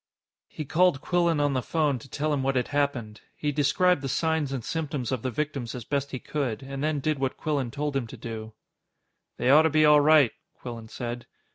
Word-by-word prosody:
He 155 - -6
called 175 0 +3
Quillan 170 -3 +1
on 145 -1 +2
the 130 - 0
phone 150 -2 0
to 135 - -14
tell 150 +3 -1
him 140 - 0
what 135 0 0
had 125 - 0
happened. 140 -7 -1
He 150 - -1
described 150 +4 +2
the 135 - -3
signs 160 -1 0
and 130 -4 -4
symptoms 145 -6 -3
of 130 -4 -1
the 130 - -2
victims 135 -2 -3
as 120 -3 -7
best 140 +1 -1
he 135 - -4
could, 135 -3 -3
and 135 +1 -5
then 155 -1 0
did 155 0 0
what 135 -1 -1
Quillan 145 -5 -1
told 145 +2 -3
him 130 -4 -1
to 125 - -10
do. 110 -1 -7 0.8
"They 125 - +2
ought 150 +3 +8
to 160 - +3
be 155 0 +4
all 150 -1 +7
right," 150 -4 +6 0.3
Quillan 115 -2 -8
said. 120 +1 -6
140 Hz, 220 wpm, -27 LUFS, 125-150 Hz, 0.8 s, ought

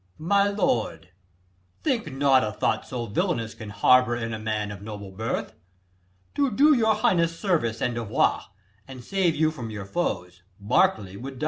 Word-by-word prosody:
Berk. 95 - -13
My 200 +1 +4
lord, 120 - -1 0.7
think 245 - -1
not 135 -1 +3
a 105 - -2
thought - - -1
so 120 -2 -4
villanous 115 +1 -1
Can 110 -2 -9
harbour 125 +3 +4
in 115 -1 -4
a 110 - -4
man 105 -1 -2
of 100 -1 -9
noble 100 -2 -8
birth. 110 +4 -3 0.8
To 280 -2 +1
do 290 +7 +5
your 220 -4 +3
highness 170 -5 +1
service 155 - 0
and 125 - 0
devoir, 115 -3 0 0.4
And 130 -2 -10
save 185 -2 +1
you 155 0 +2
from 125 -7 -7
your 105 -3 -6
foes, 90 - -3 0.2
Berkeley 105 - +1
would 130 +4 -8
die. - - -11
120 Hz, 175 wpm, -25 LUFS, 105-175 Hz, 0.8 s, do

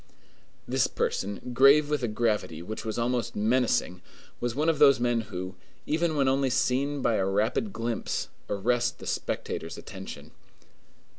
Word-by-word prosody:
This - - +2
person, 100 +5 -3
grave 140 +4 +6
with 150 -1 -1
a 120 - 0
gravity 105 -7 -1
which 110 +5 -6
was 110 -1 -4
almost 120 0 -1
menacing, 110 -5 +1 0.4
was 120 -1 -2
one 150 +3 0
of 160 -3 +2
those 140 -3 +7
men 120 -1 +1
who, 95 -3 -6 0.3
even 160 +1 0
when 140 -2 +2
only 135 0 +2
seen 130 +2 0
by 115 - +2
a 95 - +1
rapid 110 - 0
glimpse, 115 - -2 0.2
arrest 120 +4 0
the - - -11
spectator's 80 - -3
attention. - - -9
120 Hz, 150 wpm, -28 LUFS, 110-135 Hz, 0.4 s, those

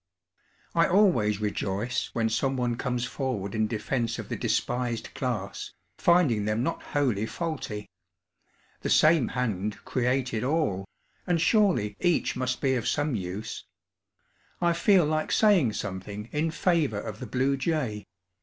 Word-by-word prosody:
I 165 0 +4
always 165 - +3
rejoice 105 +3 -2
when 115 -1 +1
someone 125 +1 0
comes 125 0 -2
forward 125 -7 -3
in 110 0 +1
defense 115 +1 -2
of - - -7
the - - -2
despised 120 -2 -1
class, 105 -7 -4 0.3
finding 150 -12 +3
them 105 +3 0
not 165 - -2
wholly 120 -8 0
faulty. 150 -12 -4 0.9
The - - -3
same 155 -5 +5
hand 105 -5 -2
created 125 -2 0
all, 130 - 0 0.4
and 175 -2 +2
surely 165 - +3
each 175 -2 +1
must 130 0 -2
be 135 -2 +2
of 120 -4 -1
some 145 -1 0
use. 100 +1 -5 0.9
I 170 -1 +3
feel 180 0 +4
like 155 +1 -1
saying 185 - +4
something 100 +2 -5
in 155 +2 0
favor 160 - +1
of 105 0 -6
the - - -6
blue 135 +2 +1
jay. 135 -8 -2
125 Hz, 135 wpm, -27 LUFS, 105-155 Hz, 0.9 s, same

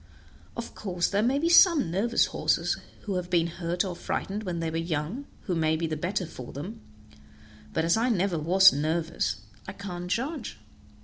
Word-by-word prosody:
Of 235 - -5
course 180 -4 -1
there 200 +1 +2
may 250 +5 +2
be 320 +4 +1
some 335 - +6
nervous 225 +7 +2
horses - - 0 0.3
who 200 -3 -2
have 180 -1 -4
been 170 -2 +3
hurt 170 +2 -2
or 180 -2 -4
frightened 200 +4 -3
when 180 -5 -3
they 165 -1 -2
were 165 - -2
young, 165 - -3
who 185 - -3
may 160 -1 +2
be 165 +1 -1
the 160 -1 -2
better 180 +4 -2
for 130 -6 -9
them; 200 +11 -7 0.9
but 160 - 0
as 170 - +4
I 230 +3 +1
never 190 -6 +1
was 190 +5 +6
nervous, 155 - -1 0.3
I 190 - -5
can't 180 -3 -6
judge." 265 - -2
180 Hz, 185 wpm, -27 LUFS, 165-210 Hz, 0.9 s, some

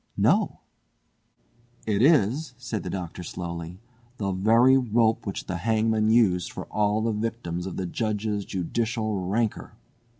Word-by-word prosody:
"No!" - - +2 1.2
"It 105 -1 +1
is," 135 0 +3
said 120 -3 -4
the - - -5
Doctor 90 -2 -5
slowly, 85 0 -6 0.4
"the 100 -4 -1
very 115 +7 +5
rope 115 -4 +2
which 100 - -4
the 90 - -3
hangman 110 +2 +1
used 100 -7 +3
for - - -7
all 105 0 +1
the 115 - +1
victims 105 -5 -3
of 95 - -6
the 95 - -2
Judge's 105 +1 -2
judicial 110 +3 -2
rancour!" 110 +3 -1
110 Hz, 135 wpm, -26 LUFS, 95-115 Hz, 1.2 s, very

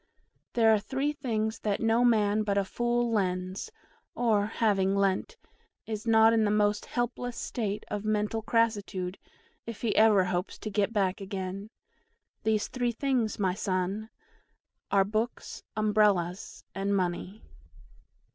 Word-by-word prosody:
"There 225 -2 +5
are 215 - +3
three 270 +7 -2
things 220 -6 -2
that 205 -2 -1
no 225 +1 +3
man 215 -3 +3
but 205 -2 0
a 200 - +2
fool 240 +2 0
lends, 185 - -1 0.4
or, 215 -4 +2
having 200 -4 +1
lent, 200 - 0 0.5
is 220 +1 -5
not 225 0 +6
in 225 -1 +3
the 210 - +2
most 210 0 +1
helpless 240 0 -3
state 210 -3 -3
of 210 -1 -4
mental 215 +1 0
crassitude 205 -5 0 0.5
if 230 -3 -7
he 230 -3 0
ever 215 -3 +6
hopes 180 +1 -2
to 215 - -6
get 205 +1 +1
back 200 -2 0
again. 195 +1 -5 0.7
These 220 -1 +1
three 245 -2 -1
things, 245 -4 0
my 190 -3 +1
son, 195 +2 -2 0.8
are 195 -1 +4
BOOKS, 220 +3 -3 0.2
UMBRELLAS, 205 -4 +1
and 200 +1 -1
MONEY! 185 +2 -2
210 Hz, 135 wpm, -29 LUFS, 195-225 Hz, 0.8 s, not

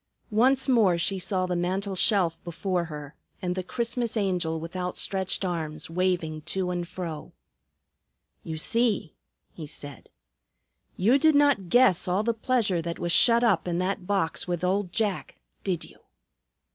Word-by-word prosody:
Once 255 +5 +3
more 220 -9 +4
she 190 +3 0
saw 185 0 0
the 180 -1 -2
mantel 190 +3 -2
shelf 180 -4 +2
before 175 +1 -2
her 150 -2 -8 0.3
and 180 -1 -2
the 185 - -2
Christmas 235 +4 -2
Angel 180 -5 0
with 165 +3 -8
outstretched 185 +1 -2
arms 160 -3 -4
waving 170 -3 -1
to 185 +3 -2
and 175 -1 -3
fro. 170 -4 -6 1.1
"You 160 -1 -6
see!" 220 -2 0 0.4
he 155 -3 -9
said. 145 -2 -10 0.9
"You 235 +9 +3
did 315 +1 +4
not 285 -11 +3
guess 245 -8 +4
all 185 +4 +1
the 235 +1 +1
pleasure 220 -6 0
that 170 0 -4
was 175 - -2
shut 235 +6 +5
up 190 -8 +2
in 170 -1 -1
that 185 0 -2
box 195 -6 0
with 175 -1 -2
old 185 0 0
Jack, 210 -3 -2 0.3
did 185 -4 -2
you?" - - -15
185 Hz, 155 wpm, -26 LUFS, 170-210 Hz, 1.1 s, shut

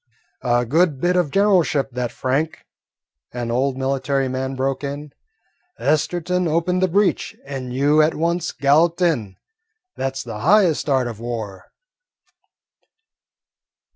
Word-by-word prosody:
"A 120 0 +1
good 155 +2 +2
bit 180 +3 +1
of 175 -5 +2
generalship, 175 -7 +2
that, 125 -1 -3
Frank," 145 +5 -2 0.7
an 120 -1 -3
old 130 +2 0
military 135 0 0
man 130 +1 -3
broke 135 +1 -2
in. 145 +1 -5 0.7
"Esterton 175 +4 0
opened 170 +3 0
the 185 - +3
breach 195 +3 0
and 135 -2 -6
you 145 +4 +3
at 155 +1 +2
once 170 +1 -1
galloped 160 +5 +2
in. 115 - 0 0.6
That 135 0 -2
's - - -4
the 115 -3 -7
highest 175 - +3
art 130 -2 +2
of 115 -3 -6
war." 115 -5 -6
140 Hz, 130 wpm, -21 LUFS, 130-170 Hz, 0.7 s, the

